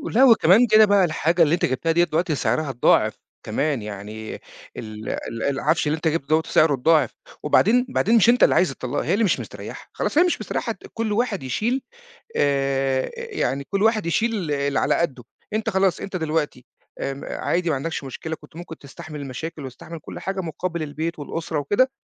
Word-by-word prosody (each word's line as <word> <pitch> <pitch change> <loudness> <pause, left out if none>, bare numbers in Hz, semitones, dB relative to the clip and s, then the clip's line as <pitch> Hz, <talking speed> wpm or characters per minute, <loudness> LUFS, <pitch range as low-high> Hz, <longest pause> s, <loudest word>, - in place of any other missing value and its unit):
لأ، 255 - +6
وكمان 230 -1 +6
كده 215 0 +7
بقى 200 -2 +4
الحاجة 165 +1 +1
اللي 155 0 +2
أنت 175 - +2
جِبتها 135 +6 0
ديّة 170 +1 +4
دلوقتي 165 -1 0
سعرها 155 +1 0
اتضاعف 125 -2 +3 0.3
كمان، 140 +3 -1
يعني 105 +1 -7 0.4
ال 110 0 -7
ال 115 0 -4
العفش 140 +2 +1
اللي 150 - +1
أنت 160 +1 -2
جِبته 160 -3 -1
دوّة 155 +2 +3
سعره 155 -1 +3
اتضاعف، 150 +2 +3 0.3
وبعدين 225 +11 +4
بعدين 235 -2 +2
مش 225 - +5
أنت 245 +1 +5
اللي - - +5
عايز 180 - +3
الطلاق، 130 +1 -3
هي - - 0
اللي 215 +3 +2
مش 200 - +2
مستريحة، - - -9
خلاص - - -2
هي 340 - +7
مش 360 - 0
مستريحة، - - -2
ت - - -10
كل 225 -1 -2
واحد 215 - 0
يشيل 220 - -1 0.6
آآ 135 -1 +1
يعني 420 - -2
كل 195 0 0
واحد 220 -3 +2
يشيل 205 -1 0
اللي 140 -1 0
على - - +2
قَدُّه. 135 -8 -1 0.3
أنت 215 +1 -1
خلاص، 190 -2 +1
أنت 195 - -5
دلوقتي 155 -6 -2 0.4
آمم 140 +1 -4
عادي 175 0 -1
ما - - +2
عندكش 155 +2 -4
مشكلة، 160 +4 -5
كنت - - -17
ممكن 165 -2 -9
تستحمل 150 +2 -10
المشاكل، 145 +3 -6
وتستحمل 135 +6 -9
كل - - -9
حاجة، 195 +1 -3
مُقابل 170 0 -4
البيت، 155 +2 -4
والأُسرة، 160 +2 -4
وكده، 205 - +2
160 Hz, 190 wpm, -23 LUFS, 140-195 Hz, 0.6 s, كده